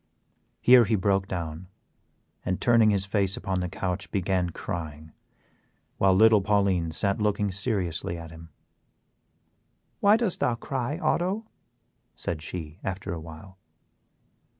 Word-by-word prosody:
Here 125 -1 +7
he 110 +2 +1
broke 95 0 +1
down 85 -1 -5 0.8
and, 90 - -2
turning 115 -2 +4
his 100 -2 +2
face 100 -1 0
upon 95 -1 -2
the 90 0 -3
couch, 95 +1 -4
began 95 -2 0
crying, 80 -4 -6 0.9
while 95 -1 +4
little 110 +1 +6
Pauline 95 -4 +1
sat 100 +6 +1
looking 105 -1 0
seriously 95 -5 -1
at 85 -1 -9
him. 80 0 -12 1.5
"Why 205 +2 +5
dost 225 -6 -1
thou 120 - +1
cry, 130 +4 -3
Otto?" 185 +5 0 0.7
said 80 -3 -4
she, 80 0 -7
after 95 0 -4
a 85 - -5
while. 85 +4 -12
95 Hz, 125 wpm, -26 LUFS, 85-105 Hz, 1.5 s, Here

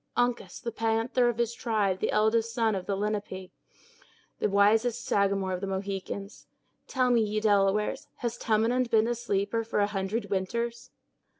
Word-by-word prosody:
Uncas, 245 0 0
the 235 - -4
panther 225 +2 +1
of 235 - -2
his 235 -1 0
tribe, 210 -6 0
the - - 0
eldest 220 +2 +2
son 225 -3 +2
of 190 -2 -4
the 200 - 0
Lenape, 200 -2 -3 0.9
the - - +1
wisest 220 +4 +3
Sagamore 195 -1 +1
of 180 - -3
the 195 - -3
Mohicans! 195 +1 -5 0.4
Tell 255 -2 +1
me, 235 -2 +4
ye 215 0 0
Delawares, 205 -1 +2
has 235 -1 -3
Tamenund 235 +2 +1
been 220 0 +3
a 240 - +1
sleeper 225 -1 -1
for 225 -1 -2
a 205 - +4
hundred 205 +1 -3
winters?" 235 +5 -2
215 Hz, 165 wpm, -28 LUFS, 200-235 Hz, 0.9 s, me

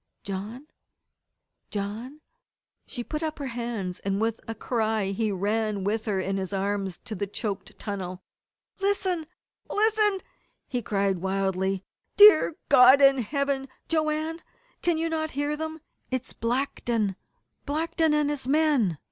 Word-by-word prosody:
"John 205 +8 -5 1.0
John 220 +8 -5 0.3
" - - -53
She 245 - -4
put 305 +5 -4
up 315 -1 -2
her 285 - -4
hands, 230 -7 -3
and 195 0 -1
with 225 +1 0
a 225 - -4
cry 220 -3 0
he 215 +2 0
ran 205 +1 -1
with 215 +3 -1
her 205 -4 0
in 195 +1 -1
his 190 -1 -3
arms 195 -1 -1
to 225 - -5
the 200 0 -3
choked 200 -1 -5
tunnel. 185 -3 -5 0.6
"Listen! 380 -5 0 0.4
Listen!" 425 -2 +2 0.5
he 250 -2 -2
cried 195 -3 0
wildly. 190 0 0 0.3
"Dear 410 -6 +8
God 260 0 +8
in 275 -1 +6
Heaven, 275 +2 -1 0.2
Joanne 315 +1 0 0.4
can 345 -2 +2
you 325 +1 0
not 315 -1 -1
hear 290 +1 0
them? 315 +1 -5 0.3
It's 255 0 -3
Blackton 230 -4 -1 0.5
Blackton 320 +2 +1
and 295 -1 +2
his 275 -3 -3
men! 280 - +3
235 Hz, 140 wpm, -27 LUFS, 200-305 Hz, 1.0 s, Dear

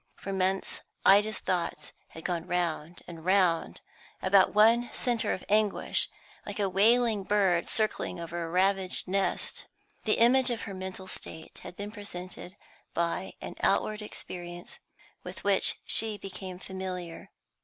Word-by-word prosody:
For 195 - -6
months 190 0 0 0.2
Ida's 210 +2 +5
thoughts 170 -4 -2
had 165 - -11
gone 175 -2 -2
round 170 -1 -2
and 165 -2 -9
round 185 -3 +2 0.4
about 190 0 +5
one 230 +3 +5
centre 240 -2 0
of 185 - -4
anguish, 210 -1 +2 0.3
like 205 0 -6
a 200 - +2
wailing 220 +3 +4
bird 190 -4 +2
circling 215 -4 0
over 170 0 -4
a 165 - -5
ravaged 190 +2 +2
nest. 195 +1 -1 0.4
The 215 - +3
image 250 +3 +5
of 235 -2 -2
her 200 - -6
mental 190 0 -6
state 160 -3 -9
had - - -10
been 205 +2 -6
presented 185 -3 -7 0.4
by 170 +3 -1
an - - -6
outward 215 0 +1
experience 175 -4 -8 0.4
with - - -9
which - - +3
she 220 -2 +3
became 185 -2 -7
familiar. 185 -2 -6
190 Hz, 140 wpm, -29 LUFS, 175-210 Hz, 0.4 s, Ida's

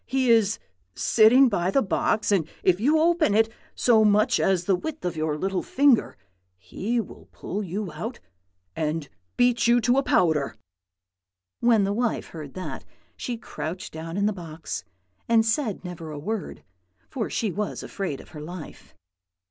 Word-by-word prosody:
He 260 -1 +2
is 220 -2 +4 0.4
sitting 240 +5 +6
by 185 -6 0
the 270 +8 +2
box, 210 +3 0
and 180 -6 +2 0.2
if 185 -1 +3
you 290 +8 +3
open 325 - +3
it 225 +1 +4 0.3
so 225 -3 +4
much 210 +1 +3
as 185 -2 +1
the 195 - +3
width 310 - -6
of 175 - -2
your 155 -1 -1
little 190 +3 -1
finger, 275 -3 +2 0.4
he 195 - -3
will 220 - -8
pull 205 - -5
you 195 0 -4
out 220 +11 -6 0.6
and 155 -1 -2 0.3
beat 245 -2 +3
you 240 +1 +5
to 245 +4 +3
powder.' 160 - +2 1.0
"When 230 -3 +4
the 200 +1 0
wife 235 +1 -1
heard 150 -4 -9
that 185 - -6 0.3
she 245 -3 -4
crouched 180 -5 -6
down 165 +2 -6
in 200 - +1
the 210 - +1
box, 160 - -6 0.5
and 225 -1 +4
said 220 -4 -1
never 170 -3 -7
a 150 - -6
word, 205 +7 -5 0.4
for 235 -5 -3
she 220 -4 -1
was 210 +3 -3
afraid 190 -9 -4
of - - -14
her 150 - -9
life. 170 +1 -10
205 Hz, 165 wpm, -25 LUFS, 170-235 Hz, 1.0 s, sitting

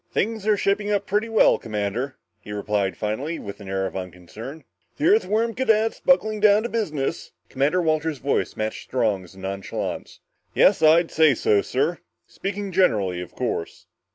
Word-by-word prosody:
"Things 220 0 -1
are 210 -1 +4
shaping 205 +1 0
up 205 -1 0
pretty 210 +4 0
well, 225 - +4
Commander," 110 +5 -3 0.2
he 105 - -11
replied, 100 -1 -1
finally, 130 +10 -3
with 100 +1 -8
an 100 -2 -9
air 95 0 -1
of 95 - -5
unconcern. 95 - -8 0.3
"The 295 - -1
Earthworm 230 - +3
units 225 -3 +1
buckling 215 -5 +2
down 210 0 +5
to 235 - -3
business?" 155 - -3 0.2
Commander 145 +7 +1
Walters' 155 -1 0
voice 140 +2 -1
matched 110 0 -3
Strong's 100 -8 -1
in 95 - -12
nonchalance. 95 0 -5 0.4
"Yes, - - +5
I'd 165 +2 +5
say 155 -4 +4
so, 105 -2 +2
sir. 145 - -1 0.3
Speaking 200 0 -5
generally, 105 - +2
of 90 - -10
course." 85 - -4
150 Hz, 160 wpm, -23 LUFS, -, 0.4 s, down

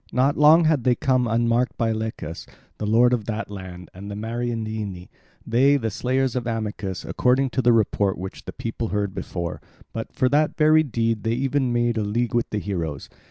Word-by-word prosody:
Not 135 +3 +2
long 155 +3 +6
had 155 -5 +2
they 125 0 +3
come 130 -2 +1
unmarked 115 +2 +1
by 115 -2 +1
Lycus, 110 -7 -5 0.3
the 105 - -2
lord 120 +3 +4
of 115 -4 -1
that 110 -1 -4
land, 90 -3 -9
and 100 +3 -9
the 100 - -5
Mariandyni—they, 115 +3 -1
the 115 -5 -2
slayers 130 +4 0
of 125 -2 -2
Amycus, 105 -4 -3
according 130 +1 +1
to 130 - 0
the 120 - +4
report 105 -3 +2
which 95 +2 -7
the - - -5
people 115 0 -4
heard 100 -2 -2
before; 85 -4 -5 0.3
but 115 - -5
for 130 -3 +1
that 150 +3 +2
very 155 0 +5
deed 115 -6 -1
they 115 +2 0
even 135 0 0
made 120 -1 +1
a - - 0
league 115 +4 -1
with 120 0 +1
the 105 - -2
heroes. 85 -9 -4
115 Hz, 190 wpm, -23 LUFS, 105-125 Hz, 0.3 s, long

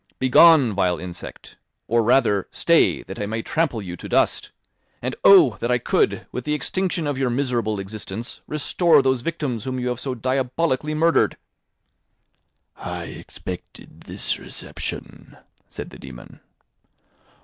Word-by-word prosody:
Begone, 130 -2 +6
vile 90 -3 +1
insect! 90 +1 -9 0.3
Or 115 0 +2
rather, 115 -4 +2
stay, - - +2
that - - -9
I 105 - -2
may 110 +1 -3
trample 150 -10 -1
you 90 -2 -6
to - - -9
dust! - - +1 0.5
And, - - -4
oh! 170 - +7
That 120 - -2
I 125 - +3
could, 120 - 0
with 125 - -5
the 150 +2 -1
extinction 175 +3 -1
of 145 -2 -2
your 130 -2 +1
miserable 120 -5 -1
existence, 105 +3 -7
restore 155 +1 +3
those 130 -2 +1
victims 135 -7 -3
whom 130 -1 -3
you 125 0 -2
have 125 -1 -3
so 130 -1 -4
diabolically 130 +4 -1
murdered!" 165 +2 +2 1.4
"I - - -5
expected 90 -1 -9
this - - 0
reception," - - -5 0.3
said - - -8
the - - -13
dæmon. 65 -2 -12
125 Hz, 140 wpm, -22 LUFS, 110-150 Hz, 1.4 s, oh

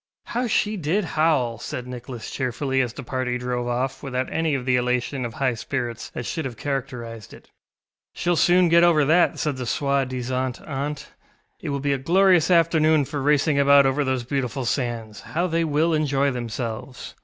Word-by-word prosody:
ŌĆ£How 245 0 -1
she 210 0 +1
did 180 +5 0
howl, 150 -9 +1
ŌĆØ - - -13
said 125 - -5
Nicholas 125 -1 -7
cheerfully, 130 +1 -1
as 125 -3 -1
the - - -8
party 125 0 -2
drove 125 0 -3
off 125 +2 -2
without 130 -2 -3
any 160 -3 +1
of 130 -2 -4
the 130 -1 +2
elation 125 +2 -1
of 115 -1 -5
high 130 -2 +1
spirits 120 -1 -4
that 125 - -4
should 160 - -3
have 125 -4 -6
characterised 120 -6 -5
it. - - -19 0.6
ŌĆ£SheŌĆÖll 175 -1 0
soon 180 0 +5
get 170 +1 +6
over 160 -4 +4
that, 170 +4 +4
ŌĆØ - - -14
said 150 -4 -1
the 125 -2 -4
soi 140 +2 +1
disant 130 0 -3
aunt; 145 +1 -4 0.5
ŌĆ£it - - -4
will 140 0 -1
be 140 0 0
a 135 - -2
glorious 180 +3 +4
afternoon 160 -3 +4
for 145 +1 -4
racing 145 +1 +2
about 140 0 +6
over 135 +2 +1
those 130 -2 -1
beautiful 135 0 -2
sands. 115 -4 -2
How 175 +3 -2
they 165 -1 0
will 160 +2 +1
enjoy 140 -2 +1
themselves! 120 +1 -5
135 Hz, 190 wpm, -23 LUFS, 125-155 Hz, 0.6 s, get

